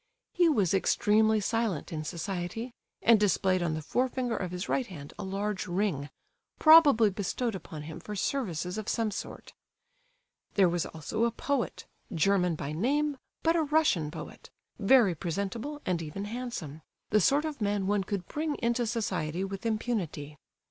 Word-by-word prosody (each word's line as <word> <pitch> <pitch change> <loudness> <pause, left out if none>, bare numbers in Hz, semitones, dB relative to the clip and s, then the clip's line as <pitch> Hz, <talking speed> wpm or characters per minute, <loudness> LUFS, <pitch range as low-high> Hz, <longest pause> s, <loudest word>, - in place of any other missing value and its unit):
He 350 -1 +4
was 205 - +2
extremely 215 +3 +3
silent 210 -6 -1
in 155 -1 -3
society, 180 +8 -4 0.3
and 230 -2 +6
displayed 190 -2 +2
on 165 -2 0
the 155 - -5
forefinger 250 - -1
of 180 - -3
his 180 +2 -5
right 260 -3 0
hand 145 -6 -10
a - - -3
large 195 +1 -2
ring, 175 -6 -1 0.5
probably 290 -10 +7
bestowed 215 +4 -2
upon 160 -5 -7
him 155 +1 -8
for 210 - -7
services 185 - -2
of 215 - -4
some 225 -2 0
sort. 200 - -7 1.0
There 195 -3 +5
was 175 0 0
also 190 +9 -2
a 235 - +1
poet, 275 +2 -2 0.3
German 180 0 +2
by 150 -2 -5
name, 280 - 0 0.3
but 330 +1 +3
a 335 - +3
Russian 300 - +2
poet; 150 - -9 0.3
very 215 -2 +5
presentable, 200 - -4
and 180 -2 0
even 165 +6 -5
handsome—the 210 - -3
sort 285 - +3
of 300 -6 -5
man 205 -1 0
one 200 0 +1
could 190 -2 -4
bring 305 0 -2
into 235 0 0
society 185 -7 -2
with 195 +3 -4
impunity. 205 -10 -2
205 Hz, 155 wpm, -29 LUFS, 175-235 Hz, 1.0 s, probably